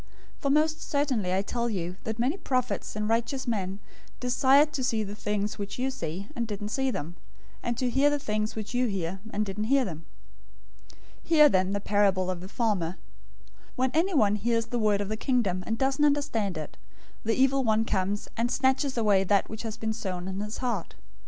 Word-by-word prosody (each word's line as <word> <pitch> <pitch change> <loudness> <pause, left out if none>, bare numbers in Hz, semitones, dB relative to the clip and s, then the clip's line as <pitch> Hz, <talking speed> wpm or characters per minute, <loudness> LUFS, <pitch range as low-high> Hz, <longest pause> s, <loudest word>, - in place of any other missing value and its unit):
013:017 - - -27
For 280 - 0
most 310 +2 +2
certainly 265 -10 0
I 190 +1 +1
tell 235 +3 -2
you 180 -4 -3
that 220 0 -3
many 250 +7 +1
prophets 255 - -2
and 210 0 -1
righteous 235 +4 0
men 195 -5 -2 0.4
desired 270 +4 +4
to 265 - -2
see 225 -3 +1
the 205 0 -6
things 210 0 -2
which 200 0 -5
you 260 +2 0
see, 185 -5 -5
and 235 -1 -2
didn't 205 -1 -4
see 265 +4 0
them; 170 - -4 0.4
and 235 -1 -2
to 255 - 0
hear 270 +4 +3
the 290 - +1
things 215 -4 -2
which 215 +1 -5
you 250 0 +2
hear, 190 -2 -3
and 210 0 -1
didn't 205 +2 -3
hear 270 +2 +3
them. 165 -4 -7 0.8
013:018 - - -19 0.3
"Hear, 300 -3 +7
then, 190 -3 +2
the 200 - 0
parable 195 -2 +2
of 180 -2 -5
the 185 - -7
farmer. 200 -8 0 0.5
013:019 - - -28 0.2
When 260 0 +1
anyone 310 - +3
hears 230 +2 +1
the 245 - -2
word 210 -2 +2
of 200 - -3
the 215 - -1
Kingdom, 215 -8 0
and 225 - -1
doesn't 270 +3 +1
understand 280 - +1
it, 155 -2 -7 0.5
the 225 0 +1
evil 270 +1 +3
one 220 -1 +2
comes, 200 0 -1
and 230 +1 0
snatches 265 +1 +1
away 205 -4 +4
that 200 +1 +2
which 220 - -5
has 225 -2 -5
been 220 0 -2
sown 185 -5 -4
in 190 0 -4
his 210 +1 -4
heart. 235 -9 -3
220 Hz, 205 wpm, -28 LUFS, 200-260 Hz, 0.8 s, Hear